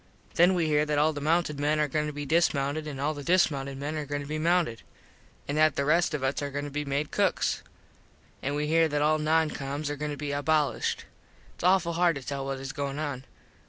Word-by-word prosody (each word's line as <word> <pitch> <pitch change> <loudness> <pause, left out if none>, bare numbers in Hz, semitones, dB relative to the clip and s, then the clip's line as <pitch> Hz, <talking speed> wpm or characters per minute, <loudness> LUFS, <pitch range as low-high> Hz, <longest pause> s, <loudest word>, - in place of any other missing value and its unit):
Then 175 +2 +5
we 170 -2 +1
here 150 -1 +3
that 150 -1 0
all 155 +2 +3
the 145 - -5
mounted 155 -1 +1
men 150 +1 +1
are 150 - +2
goin 150 +2 -1
to - - -3
be 145 0 -5
dismounted 155 -1 +1
an 140 -3 -6
all 145 +3 0
the 145 -1 -7
dismounted 140 -6 +1
men 145 +3 -4
are 150 -1 -3
goin 145 0 -3
to - - -7
be 155 +2 -3
mounted. 165 -7 +1 0.7
An 145 - -2
that 155 -2 +4
the 140 - 0
rest 165 +1 +2
of 140 - -4
us 135 +2 0
are 145 - -2
goin 145 +1 -4
to 145 - -6
be 150 +1 -2
made 145 +1 -2
cooks. - - +1 0.8
An 140 +2 -2
we 150 0 -1
here 165 +1 +3
that 145 -1 0
all 155 +1 +3
non 155 +1 +2
coms 140 +2 -4
are - - -2
goin 150 +1 -4
to 145 - -4
be 145 0 -4
abolished. 145 +1 0 0.5
Its - - -12
awful 180 -2 +3
hard 170 -1 +3
to 140 - -6
tell 140 -1 -3
what 135 -1 -3
is 135 0 -5
goin 140 -1 -4
on. 145 -4 -4
150 Hz, 245 wpm, -28 LUFS, 140-155 Hz, 0.8 s, Then